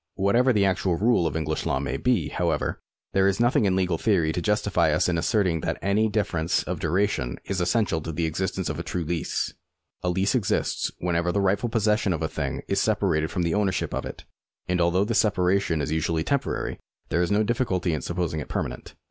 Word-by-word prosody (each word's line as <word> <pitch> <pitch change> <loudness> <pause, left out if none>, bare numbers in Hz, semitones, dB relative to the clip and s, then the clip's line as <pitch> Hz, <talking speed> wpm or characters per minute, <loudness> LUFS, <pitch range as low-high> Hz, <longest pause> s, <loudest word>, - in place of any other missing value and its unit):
^ - - -60
Whatever 120 +7 +3
the 105 -4 +3
actual 95 -2 +1
rule 100 -2 +2
of 80 - -4
English 80 -1 -2
law - - +1
may 70 -1 -3
be, 105 - +1
however, 85 -4 -1 0.3
there 95 0 +4
is 100 0 +1
nothing 120 0 +3
in 95 -2 +2
legal 90 -3 0
theory 90 -8 +2
to 90 - -2
justify 100 -5 +2
us 80 +4 +2
in 90 - +1
asserting 90 -1 +1
that - - -2
any 100 +4 +2
such 105 - -7
difference 85 -6 0
of - - -4
duration 90 -8 0
is 95 -1 -2
essential 90 -2 +1
to 80 - -5
the 80 +1 -1
existence 90 +2 -2
of 75 -1 -3
a - - -3
true 90 - -3
lease. 80 0 -2 0.5
A 90 - -1
lease 95 +5 +1
exists 115 -8 0
whenever 85 0 0
the 100 - 0
rightful 100 +4 +1
possession 105 -3 +1
of 80 -1 -3
a - - +1
thing - - -4
is - - +1
separated 80 -5 +1
from 90 -3 -1
the 85 - 0
owner 105 -2 +2
ship - - -3
of - - -3
it; - - -9 0.4
and 90 0 +1
although 90 +3 +2
this 115 +1 +1
separation 90 -5 +1
is 75 - -3
usually 80 0 0
temporary, 140 - -2 0.3
there 85 - +1
is 90 - +1
no 105 +1 +3
difficulty 100 -7 0
in 75 - -2
saipposing 85 0 -2
it - - -7
permanent. - - -4
90 Hz, 220 wpm, -25 LUFS, 80-105 Hz, 0.5 s, there